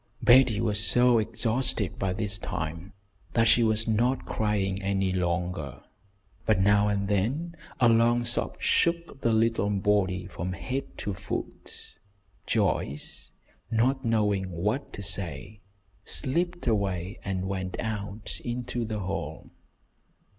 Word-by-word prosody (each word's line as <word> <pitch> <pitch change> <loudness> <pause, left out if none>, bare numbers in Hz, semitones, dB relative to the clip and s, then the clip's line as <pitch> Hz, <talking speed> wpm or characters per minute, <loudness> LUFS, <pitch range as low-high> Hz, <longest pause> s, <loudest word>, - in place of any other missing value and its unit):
'" - - -38
Betty 120 -4 +6
was 105 -2 0
so 120 +1 +4
exhausted 115 -2 -1
by 95 -1 0
this 100 +1 -2
time, 85 -1 -5 0.4
that 115 -1 +3
she 120 - +5
was 110 0 +1
not 120 +4 +1
crying 100 -3 0
any 95 -1 0
longer; 90 -6 -2 0.6
but 105 -3 +4
now 100 +2 +4
and 100 -1 0
then 130 - 0 0.2
a 120 - +6
long 120 +1 +4
sob - - -1
shook 170 -4 +1
the 115 - +2
little 110 -2 +2
body 100 -2 +1
from 90 0 -4
head 130 +7 -4
to 100 - -3
foot. 100 +2 -7 0.5
Joyce, 70 +2 -1 0.4
not 130 +4 +1
knowing 105 -5 +1
what 105 +11 -2
to 100 - -6
say, 95 +1 -1 0.4
slipped 175 +3 -1
away 100 -5 -1
and 95 -1 -2
went 95 -1 -3
out 105 -1 -4
into 120 0 -3
the 110 -1 -3
hall. 90 -5 -5
105 Hz, 130 wpm, -27 LUFS, 95-115 Hz, 0.6 s, Betty